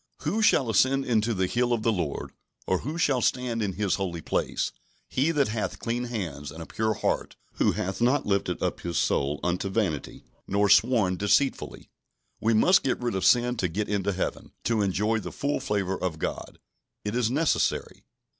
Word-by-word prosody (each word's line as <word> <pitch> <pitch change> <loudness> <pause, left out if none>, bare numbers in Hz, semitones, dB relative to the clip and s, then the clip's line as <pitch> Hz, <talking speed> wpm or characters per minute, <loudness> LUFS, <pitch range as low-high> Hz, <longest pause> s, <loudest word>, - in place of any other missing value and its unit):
"Who 185 +9 0
shall 140 - +4
ascend 130 +5 +3
into 115 -1 +1
the 95 0 +1
hill 120 +6 0
of 115 -2 -1
the 115 - +3
Lord? 85 -9 -3 0.3
or 95 - +1
who 155 +5 -5
shall 145 -6 +2
stand 120 -1 0
in 100 -3 -1
His 100 0 0
holy 85 -3 -2
place? - - -1 0.4
He 135 +5 +1
that 145 -7 +2
hath 110 0 -2
clean 120 +1 -2
hands, 85 - -5
and 80 - -10
a 80 - -6
pure 110 +3 -1
heart; - - -1 0.2
who - - +3
hath 95 +3 -3
not 130 +4 +3
lifted 100 -3 -1
up - - -1
his 85 -2 -3
soul 70 +1 +1
unto 90 +2 -1
vanity, 95 -8 -2 0.2
nor 100 +1 +2
sworn 110 -5 +4
deceitfully" 105 +8 0 0.5
We 110 +1 +2
must 180 - +5
get 130 - -1
rid 120 -3 -2
of 95 -1 -2
sin 120 +4 +4
to 95 - +1
get 100 +6 -2
into 100 -1 0
Heaven, 95 - -4
to 115 -2 +1
enjoy 105 +3 +1
the - - -6
full 145 +1 -1
favour 100 -7 -2
of 90 -4 -2
God. - - -4 0.5
It 105 +2 -2
is 120 -2 +2
necessary. 150 +5 0
110 Hz, 190 wpm, -27 LUFS, 95-125 Hz, 0.5 s, must